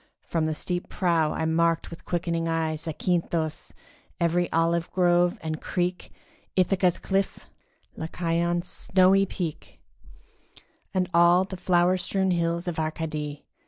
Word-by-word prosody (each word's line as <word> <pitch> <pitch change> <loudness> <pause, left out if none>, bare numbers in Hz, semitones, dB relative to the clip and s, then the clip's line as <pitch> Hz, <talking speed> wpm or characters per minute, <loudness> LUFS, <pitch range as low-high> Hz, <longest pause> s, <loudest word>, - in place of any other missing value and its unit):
From 160 -2 0
the 155 - -1
steep 175 +2 -3
prow 165 -5 +1
I - - -2
marked 165 +1 +1
with 165 - -10
quickening 170 -1 -1
eye 165 -1 0
Zakynthos, 165 0 -2 0.5
every 175 +1 +1
olive 165 +1 +1
grove 175 +1 +3
and 155 -1 -3
creek, 180 0 -2 0.4
Ithaca's 185 -1 +2
cliff, 195 0 -2 0.5
Lycaon's 170 +1 -1
snowy 195 +1 +3
peak, 170 -5 -6 1.1
And 185 -1 0
all 175 +2 +6
the 190 0 -6
flower 180 0 +2
strewn 190 +1 0
hills 170 0 0
of 170 -2 -2
Arcady. 155 -2 -3
170 Hz, 125 wpm, -26 LUFS, 165-180 Hz, 1.1 s, all